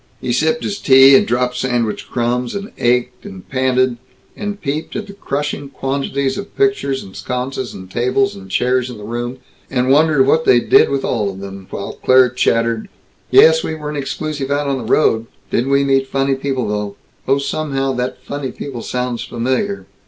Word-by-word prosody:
He 120 - -2
sipped 160 - +1
his 200 - -3
tea, 135 0 +7
and - - +4
dropped 125 +1 0
sandwich 120 -4 -1
crumbs, 120 +2 -1
and 200 +1 -5
ached, 125 +1 +1
and 95 -1 -10
panted, 130 -1 +1 0.4
and 205 -1 -4
peeped 150 +1 -4
at 210 - -3
the 200 - -11
crushing 145 -5 -3
quantities 135 0 -2
of 200 - -9
pictures 400 - +1
and 95 - -13
sconces 125 +3 -4
and 95 - -9
tables 125 - +1
and 95 -1 -11
chairs 125 +5 +1
in 125 - -8
the 105 - -10
room, 120 +3 -4 0.3
and 130 0 +1
wondered 150 -1 +4
what 160 +4 +3
they 120 - +5
did - - +4
with 140 -1 -1
all 105 -4 0
of 95 -1 -8
them, 95 -1 -9
while 100 - -6
Claire 130 -1 +6
chattered: 115 -2 0 0.4
"Yes, 160 0 +6
we 160 - -3
weren't 150 -1 -5
exclusive 145 0 -3
out 145 +1 0
on 135 -1 -1
the 120 - -6
road. 115 -6 +3 0.2
Didn't 125 +3 0
we 140 0 +3
meet 135 -1 +2
funny 135 0 0
people 135 -2 -2
though! 105 -1 -3 0.3
Oh, 135 +1 +4
somehow 140 -1 -1
that 125 +1 -3
'funny 140 -1 -4
people' 125 -3 -7
sounds 125 -1 -3
familiar. 130 - -2
130 Hz, 185 wpm, -18 LUFS, 120-140 Hz, 0.4 s, tea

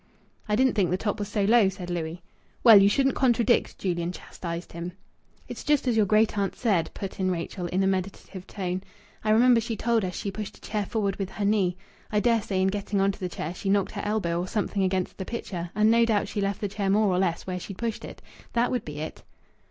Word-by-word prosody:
"I 210 - +3
didn't 260 +3 +3
think 195 -5 +2
the 180 - +1
top 210 +2 -2
was 205 - -2
so 205 0 -1
low," 215 -1 +5
said 185 -2 -7
Louis. 170 0 -4 0.4
"Well, 225 -4 +9
you 200 - +6
shouldn't 270 +5 +2
contradict," 240 -2 +2
Julian 175 -2 -1
chastised 170 -1 -7
him. 170 +1 -6 0.5
"It's - - -7
just 295 -3 +2
as 240 - +2
your 215 -2 +3
great 215 0 +3
aunt 195 -2 -1
said," 195 -9 +1
put 195 -1 -6
in 185 -1 +1
Rachel, 175 0 -3
in 185 +3 0
a - - +2
meditative 190 0 -3
tone. 185 -2 -3 0.4
"I 215 - -1
remember 235 +2 +5
she 225 -1 -4
told 230 0 +1
us 180 -1 -3
she 200 - -3
pushed 210 +1 -6
a - - -23
chair 210 -2 -3
forward 200 -4 -1
with 195 -2 -3
her 205 +1 -3
knee. 195 -4 +2 0.3
I 210 - +2
dare 230 0 +3
say 190 -2 -1
in 190 - +3
getting 200 0 -2
on 195 +1 +3
to - - -12
the 185 - -3
chair 165 -1 -5
she 195 - -4
knocked 200 -1 +2
her - - -5
elbow 195 -5 0
or 180 - -3
something 205 0 -1
against 185 0 -1
the - - -2
picture, 180 -7 -5
and 215 +1 +4
no 230 0 +5
doubt 220 -3 +1
she 205 - -3
left 200 0 -1
the 205 - 0
chair 200 0 -2
more 210 +2 +4
or 180 -1 +1
less 175 -3 0
where 180 -1 -3
she'd 190 +1 -8
pushed 230 -2 -3
it. - - -10 0.3
That 235 +1 +2
would 250 - -1
be 150 0 -6
it." 155 - -6
200 Hz, 245 wpm, -26 LUFS, 185-220 Hz, 0.5 s, Well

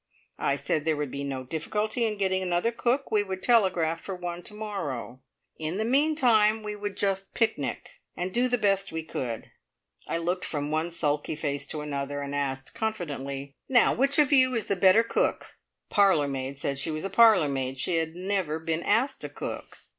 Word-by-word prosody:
I 140 - +1
said 140 +2 -1
there 160 -1 +1
would 145 -3 -3
be 140 - -4
no 135 -2 -4
difficulty 210 - -1
in 210 -1 -3
getting 190 -1 +1
another 180 +4 0
cook 250 +4 0
we 210 - +4
would 190 -2 -5
telegraph 185 -8 +3
for 195 - -5
one 175 -1 -5
to - - -8
morrow; 150 - -5 0.4
in 160 +3 -3
the 220 - 0
meantime 240 -6 +3
we 210 0 -4
would 205 -1 -5
just 195 -1 -1
picnic, 225 -1 -1 0.3
and 180 +1 -3
do 245 +1 +3
the 245 0 +1
best 195 -3 +1
we 160 0 -4
could. 120 -7 -5 0.6
I - - -1
looked 175 +2 -2
from 145 -1 -3
one 160 +2 0
sulky 150 -2 -1
face 145 -2 -3
to 155 - -4
another, 145 -1 -3
and 140 0 -5
asked 135 -2 -3
confidently: 140 -10 -4 0.2
"Now, 245 -3 +5
which 275 +3 +1
of 295 -1 +4
you 255 -2 +5
is 225 - -1
the 200 - 0
better 190 +4 +5
cook?" 230 - -1 0.3
The - - -16
parlour 195 -8 +4
maid 135 0 -4
said 140 -1 -2
she 135 - +1
was 155 +3 -3
a 195 - -4
parlour 215 -7 +6
maid. 135 -1 -2
She 165 +5 0
had 160 0 -2
never 185 -4 -1
been 160 0 -2
asked 245 +9 +1
to - - -4
cook. - - -7
180 Hz, 200 wpm, -27 LUFS, 145-215 Hz, 0.6 s, parlour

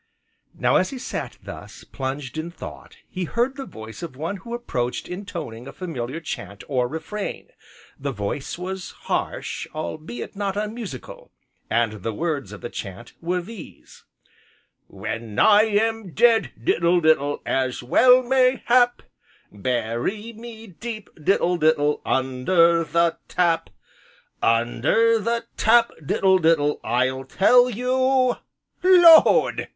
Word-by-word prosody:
Now - - +3
as - - +1
he 270 - -7
sat 250 - -5
thus, - - -10
plunged 135 0 -5
in 160 +2 -4
thought, 170 - -11
he 185 -1 -4
heard 240 - -1
the 270 -1 -7
voice 110 +5 -10
of 165 -6 -7
one 165 +8 -4
who 235 +5 -7
approached 125 - -3
intoning 170 - -7
a - - -7
familiar 140 -5 -5
chant, 100 - -7
or 125 -3 0
refrain, 195 +9 -6 0.5
the 140 0 -3
voice 105 +7 -4
was 185 +1 -6
harsh, - - -3
albeit 155 - -6
not 200 -1 -2
unmusical, 210 - -6 0.4
and 110 -3 0
the 110 +2 -3
words 150 - -2
of 105 - -10
the 120 - -5
chant 100 +4 -8
were 180 +2 -1
these: 205 -2 -12 0.8
"When 110 +2 -6
I 210 0 +6
am 220 -3 -1
dead, 230 -2 +4
diddle 170 +6 +2
diddle, 145 -2 +2
as 130 -2 -1
well 250 - +5
may 255 0 +2
hap, 245 0 +3 0.5
Bury 120 - -3
me 225 0 -10
deep, 215 +2 -8
diddle 180 0 +2
diddle, 150 -2 +2
under 165 +6 +2
the 170 +1 +1
tap, 170 - +1 0.7
Under 120 - +2
the 230 +2 -1
tap, 235 +1 +4
diddle 190 +6 +3
diddle, 160 -3 +2
I'll 130 +2 0
tell 245 - +4
you 255 +2 +1 0.2
" - - -50
"Lord!" 350 -3 +6
170 Hz, 130 wpm, -23 LUFS, -, 0.8 s, I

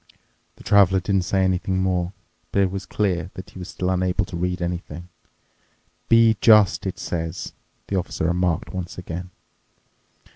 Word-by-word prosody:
The - - -15
Traveler 95 -2 +5
didn't 95 0 0
say 95 +1 +1
anything 95 0 0
more, 90 -1 0 0.4
but 100 - +3
it 95 - 0
was 95 0 -5
clear 90 -5 -1
that 95 - -9
he - - -11
was 90 - -7
still 90 0 -2
unable 90 0 0
to 95 - -8
read 90 +1 -1
anything. 85 -1 -5 0.5
" - - -41
'Be 115 -1 +5
just!' 105 -4 +5
it 95 - -4
says," 85 +1 -4 0.3
the 100 - -2
Officer 90 -3 -2
remarked 85 0 0
once 90 -2 -5
again. 90 0 -6
90 Hz, 160 wpm, -23 LUFS, 90-95 Hz, 0.5 s, Traveler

